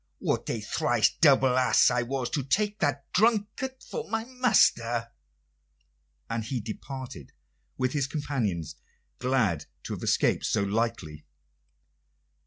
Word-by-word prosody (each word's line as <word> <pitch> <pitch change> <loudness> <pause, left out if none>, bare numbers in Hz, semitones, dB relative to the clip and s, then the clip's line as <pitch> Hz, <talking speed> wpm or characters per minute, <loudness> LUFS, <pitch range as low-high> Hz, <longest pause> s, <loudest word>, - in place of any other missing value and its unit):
What - - -2
a - - -1
thrice - - +1
double 130 -1 +5
ass 130 - +4
I 125 0 +1
was 125 0 -3
to 145 - 0
take 205 +10 0
that 145 -3 0
drunkard 225 +5 +1
for 470 -2 -6
my 225 0 -2
master!" 120 - +2 1.2
And 115 -1 -3
he 125 +3 -3
departed 115 - -8 0.4
with 130 0 0
his 140 -3 0
companions, 110 - -3 0.4
glad 115 - 0 0.2
to - - -5
have - - -6
escaped - - +1
so 100 - +1
lightly. 100 -8 -2
130 Hz, 125 wpm, -27 LUFS, 115-155 Hz, 1.2 s, double